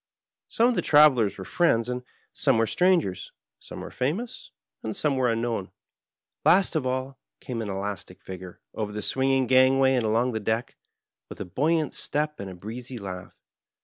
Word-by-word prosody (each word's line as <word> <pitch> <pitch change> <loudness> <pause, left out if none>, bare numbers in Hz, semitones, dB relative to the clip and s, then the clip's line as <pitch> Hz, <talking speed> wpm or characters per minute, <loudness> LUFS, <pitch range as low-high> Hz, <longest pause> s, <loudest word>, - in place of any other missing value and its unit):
8ome 235 +2 +3
of - - +1
the - - 0
travelers 140 -9 +5
were 95 - -7
friends 115 - +2
and 125 0 -3 0.3
some 135 -5 +2
were 115 - +3
strangers, 170 - +1 0.3
some - - -9
were - - -8
famous 180 - -3 0.3
and 110 -1 -5
some 150 -3 +1
were 125 -2 +2
unknown. 115 -4 -2 0.7
Last 185 -2 +4
of 145 -5 0
all 130 +1 -3 0.2
came 120 -3 -5
an 105 - -4
elastic 95 -2 -5
figure 95 -1 -9
over 105 -2 -3
the 105 0 -5
twinging 135 +2 +1
gangway 130 +1 +5
and 125 -2 +1
along 115 +3 +1
the 110 - -2
deck, 110 +3 -2 0.5
with - - -10
a - - -4
buoyant 155 - 0
step 150 +1 -2
and 100 - -5
a 95 - -9
breezy 120 +7 -7
laugh. 95 -4 -8
125 Hz, 175 wpm, -26 LUFS, 105-135 Hz, 0.7 s, travelers